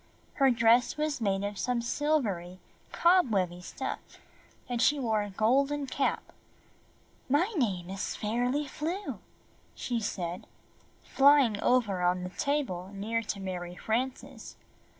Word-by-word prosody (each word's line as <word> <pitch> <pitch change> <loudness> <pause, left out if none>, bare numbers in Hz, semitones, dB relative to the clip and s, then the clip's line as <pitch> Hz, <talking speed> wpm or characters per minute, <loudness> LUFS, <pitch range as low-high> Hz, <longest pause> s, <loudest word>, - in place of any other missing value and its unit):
Her 270 - +7
dress 235 +2 +3
was 300 -4 -1
made 195 -2 0
of 205 0 -4
some 250 -1 0
silvery 230 - -1 0.3
cobwebby 210 - +2
stuff - - -5 0.7
and 245 -2 -2
she 290 +3 +4
wore 225 -5 0
a 205 - -4
golden 275 +8 +1
cap. 270 +1 -1 1.1
"My 345 - +2
name 195 - 0
is 195 +1 -3
Fairly 245 +7 -1
Flew/' 330 +8 -4 0.6
she 240 -2 -2
said, 180 -4 -4 0.6
flying 270 -6 +4
over 220 -7 +2
on 180 0 +1
the 180 - -5
table 190 -5 -2
near 225 +3 -1
to 210 -2 -4
Mary 180 -2 -5
Frances. 255 +3 -3
230 Hz, 125 wpm, -29 LUFS, 195-275 Hz, 1.1 s, Her